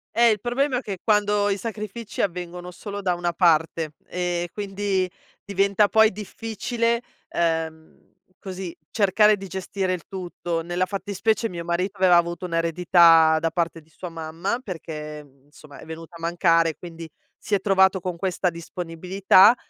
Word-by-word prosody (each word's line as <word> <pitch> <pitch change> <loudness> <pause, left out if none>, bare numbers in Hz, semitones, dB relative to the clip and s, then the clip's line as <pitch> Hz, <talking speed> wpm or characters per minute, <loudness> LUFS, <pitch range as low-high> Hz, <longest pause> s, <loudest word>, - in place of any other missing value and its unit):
Eh, 235 0 +6
il 210 - 0
problema 255 +2 0
è - - -2
che 200 -5 -5
quando 210 -1 +2
i 200 - 0
sacrifici 215 0 -5
avvengono 180 -1 -4
solo 205 +2 -7
da 180 -2 +1
una 175 0 -1
parte, 160 -2 +2
e 175 -1 -2
quindi 195 -2 -1 0.4
diventa 200 +1 +3
poi 220 0 +5
difficile, 230 +3 -2 0.3
ehm, 160 -1 -2 0.3
così, 185 -3 -6
cercare 210 0 +4
di 195 0 -8
gestire 190 +1 -2
il 175 - -5
tutto. 175 -3 -4
Nella 175 +2 -1
fattispecie, 205 +3 -1
mio 170 -1 -6
marito 180 +4 -2
aveva 185 -1 +5
avuto 170 +2 0
un'eredità, 165 -1 +5
da 165 0 -1
parte 165 -1 -1
di 160 - -27
sua 180 +2 -8
mamma, 165 +7 -3
perché, 155 -6 -7
mhmm, 140 0 -25
insomma, 145 -1 -15
è - - -11
venuta 160 +1 -9
a - - -10
mancare, 165 -1 +2
quindi, 165 -2 -9 0.3
si - - -5
è 195 - -1
trovato 190 -1 +4
con 180 -1 -4
questa 185 0 0
disponibilità, 180 +5 +3
180 Hz, 155 wpm, -24 LUFS, 165-200 Hz, 0.4 s, Eh